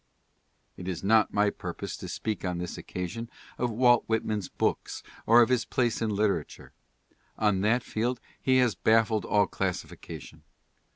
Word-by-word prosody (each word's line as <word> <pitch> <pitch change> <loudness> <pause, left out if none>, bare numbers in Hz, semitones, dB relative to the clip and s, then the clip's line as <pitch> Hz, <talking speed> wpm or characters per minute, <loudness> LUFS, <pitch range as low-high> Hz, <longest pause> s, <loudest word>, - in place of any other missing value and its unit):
It 90 - -7
is 90 -2 -4
not 110 +2 +4
my 105 0 +2
purpose - - -6
to - - -7
speak 110 -4 -3
on 90 -2 -2
this 90 0 -4
occasion 115 +6 -5 0.3
of 125 - +1
Walt 120 +1 +4
Whit 110 0 0
man's 105 -3 -2
books - - -2 0.2
or 120 +2 +8
of 115 - 0
his 125 -3 +2
place 120 0 0
in 110 - +1
literature. 100 -6 -1 0.6
On 105 -3 +2
that 115 +4 +2
field 120 +3 -2 0.2
he 130 -1 +3
has 125 -4 +3
baffled 110 -1 +2
all 105 -1 +3
classification. 90 -4 -5
110 Hz, 160 wpm, -28 LUFS, 95-115 Hz, 0.6 s, or